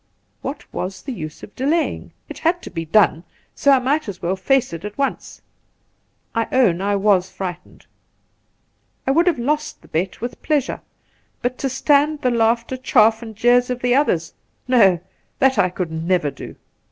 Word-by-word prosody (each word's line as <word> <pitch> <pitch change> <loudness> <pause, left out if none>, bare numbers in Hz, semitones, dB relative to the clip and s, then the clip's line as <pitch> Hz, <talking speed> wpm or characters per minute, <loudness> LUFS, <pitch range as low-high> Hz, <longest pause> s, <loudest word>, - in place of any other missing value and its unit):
What - - -5
was 190 +1 -5
the 270 - -5
use 155 -7 -8
of 205 - -11
delaying? 300 +6 -1 0.2
It - - -9
had 345 +2 +1
to - - -8
be 165 -1 -4
done; 170 -2 +3 0.3
so 280 - +1
I 270 - +7
might 270 +1 0
as 185 - -7
well 180 +3 -1
face 250 +3 +1
it 165 +1 -6
at 210 0 -7
once. 275 -1 -3 0.9
I 230 -1 0
own 215 -9 +3
I 200 +1 +1
was 195 -2 +2
frightened. 185 -2 -7 1.2
I 265 - +2
would 335 +6 +3
have 345 - +3
lost 300 +5 -2
the - - -17
bet 180 +4 -2
with 240 +2 -6
pleasure, 295 -4 -1 0.6
but 245 +1 -2
to 270 - -1
stand 290 +3 +2
the 250 - +2
laughter, 235 +2 +1
chaff, 225 -3 +3
and 220 -2 -9
jeers 245 +3 +3
of 250 0 -4
the 245 0 +3
others! 215 - +1 0.3
No 230 -7 +6
I 170 - -7 0.4
that 265 -4 +3
I 180 -2 +4
could 180 -2 -4
never 160 -1 0
do. 140 - -10
230 Hz, 180 wpm, -20 LUFS, 185-265 Hz, 1.2 s, I